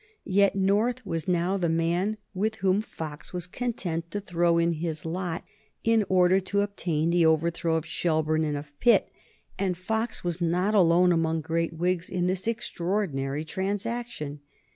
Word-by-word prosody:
Yet 200 0 +3
North 210 +6 +1
was 165 -4 -3
now 180 +2 +1
the 175 -3 0
man 170 +6 +1 0.2
with 215 +3 -1
whom 195 -1 +2
Fox 155 -8 -8
was 180 -2 -3
content 180 -6 -3
to 205 - -3
throw 175 -3 +1
in 170 0 +2
his 160 -1 -4
lot 175 0 -3 0.4
in 225 -2 +3
order 185 0 +5
to 200 +2 0
obtain 170 -5 -1
the 175 0 +4
overthrow 165 +1 +1
of 160 0 -1
Shelburne 155 -1 0
and 150 -2 -1
of 145 +1 -8
Pitt. 240 -1 +4 0.5
And 185 -3 0
Fox 220 +5 -2
was 175 0 -3
not 180 +5 +1
alone 180 -2 +5
among 165 -1 +1
great 165 +2 -1
Whigs 175 +1 -1
in 180 -1 -1
this 185 +2 -1
extraordinary 170 -9 -2
transaction. 195 -3 -3
175 Hz, 160 wpm, -27 LUFS, 165-195 Hz, 0.5 s, order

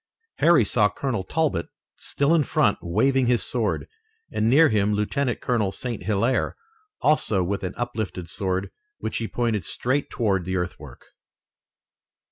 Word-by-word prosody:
Harry 165 -9 +5
saw 105 -1 +3
Colonel 120 -6 -3
Talbot 145 - -1 0.3
still 140 +3 0
in 165 - +4
front, 140 - +2
waving 130 +9 +2
his 120 -5 +2
sword, 115 0 -1 0.4
and 110 - +1
near 155 +5 +6
him 105 -2 +2
Lieutenant 120 +5 -1
Colonel 110 -6 0
St. 120 +2 -5
Hilaire, 115 +4 0 0.5
also 145 -11 +2
with 100 +3 -2
an 90 - -4
uplifted 110 -7 -4
sword, 95 +2 -2 0.3
which - - -4
he 115 - -2
pointed 115 -5 -1
straight 140 +3 -1
toward 100 -6 0
the 95 +2 -3
earthwork. 90 0 -5
110 Hz, 140 wpm, -24 LUFS, 95-130 Hz, 0.5 s, near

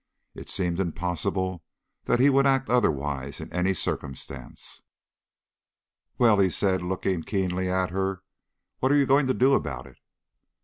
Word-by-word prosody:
It - - -10
seemed 90 -2 -1
impossible 90 +1 -2 0.4
that 120 - +2
he 135 - +6
would 135 +1 +4
act 135 -3 +1
otherwise 70 - 0
in - - -9
any 90 +2 +1
circumstance. 70 -5 -4 1.4
"Well?" 115 -4 +4
he 95 -1 +4
said, 95 0 +1
looking 90 0 -1
keenly 95 0 -1
at 95 0 0
her. 95 0 -2 0.6
"What 130 - +2
are - - +5
you 140 - +4
going 135 +1 +3
to 130 - +1
do 135 +2 +4
about - - -1
it?" - - -16
95 Hz, 145 wpm, -26 LUFS, 90-120 Hz, 1.4 s, he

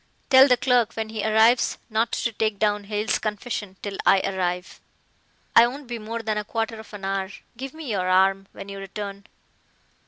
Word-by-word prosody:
"Tell 265 +1 +9
the 250 -2 +4
clerk 245 -3 +2
when 220 -1 -3
he 220 -2 -4
arrives 220 +3 +4
not 225 +1 0
to 235 - 0
take 215 -1 -1
down 210 -1 0
Hale's 210 +2 -1
confession 210 -2 -4
till 200 -1 -4
I 195 - +5
arrive. 180 -2 -3 0.7
I 235 - +8
won't 275 +4 -7
be 240 -1 -5
more 225 +2 -5
than 215 -1 -1
a - - -4
quarter 225 +1 -3
of 220 - -12
an 195 -1 -7
hour. 195 -1 -1 0.3
Give 265 +5 -7
me 310 -6 -6
your 185 -3 0
arm 195 +1 +3
when - - -10
you 200 0 -7
return." 200 +1 -7
215 Hz, 190 wpm, -24 LUFS, 195-230 Hz, 0.7 s, Tell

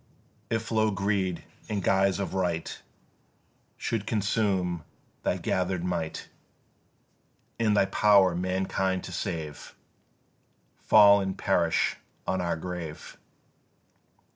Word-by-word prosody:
If 115 0 -2
low 110 -1 +3
greed 100 -3 -1 0.3
in 105 -2 -1
guise 95 0 +2
of 100 - -3
right 90 -4 -1 1.0
Should 110 -3 -3
consume 100 -5 0 0.4
thy - - 0
gather'd 90 -1 -1
might, 85 -3 -3 1.3
And 105 -2 +2
thy 100 - +5
power 100 -2 +4
mankind 95 +1 -1
to - - -7
save 80 -4 -5 1.0
Fall 100 -1 +6
and 95 0 -3
perish 85 -4 +1 0.3
on 95 0 -1
our 85 -1 -1
grave! 85 -2 -7
95 Hz, 100 wpm, -27 LUFS, 90-100 Hz, 1.3 s, Fall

